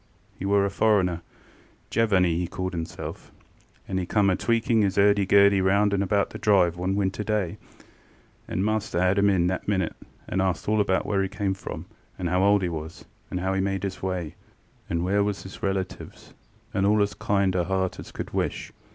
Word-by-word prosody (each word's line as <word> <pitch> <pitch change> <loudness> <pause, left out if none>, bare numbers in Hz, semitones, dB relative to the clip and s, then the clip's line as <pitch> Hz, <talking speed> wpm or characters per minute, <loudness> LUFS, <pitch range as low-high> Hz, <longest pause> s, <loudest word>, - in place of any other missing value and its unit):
ŌĆ£He - - -2
were 100 0 +3
a - - 0
foreignerŌĆöJevanny 95 0 0
he 90 +1 -1
called 95 +1 -4
hisselfŌĆöand 85 +3 -7
he 90 - -2
come 100 -2 +3
a - - +2
tweaking 115 0 +1
his 100 -2 0
ŌĆÖurdy 100 -1 +4
gurdy 100 0 +5
round 100 +2 +3
and 100 - +1
about 100 0 +1
the - - -7
drive 95 -6 +3
one 90 +2 -1
winter 100 +1 -1
day, 105 -5 -1 0.9
and 95 - -1
master 110 -3 -1
ŌĆÖad 90 +2 +3
him 100 0 +4
in 90 -3 +2
that 95 +1 -2
minute, 95 -4 0 0.3
and 95 - 0
ast 95 -1 -1
all 105 0 +3
about 95 -2 +1
where 100 -1 +1
he 95 - -1
came 100 -1 -1
from, 95 - -7 0.3
and 90 -2 -2
how 90 +2 +2
old 100 0 +4
he - - +1
was, 80 0 -7 0.2
and 90 - -3
how 95 +1 0
he 95 - +1
made 95 -1 -1
his 95 -1 -4
way, 90 -5 -3 0.6
and 85 +1 -1
where 100 +2 +2
was 100 -1 -2
his 95 - -10
relatives, 95 -1 -4 0.4
and 95 0 +1
all 105 0 +4
as 100 - -2
kind 100 -2 0
as 90 -1 0
heart 95 -1 -1
could - - -6
wish. - - -2
95 Hz, 195 wpm, -25 LUFS, 90-100 Hz, 0.9 s, gurdy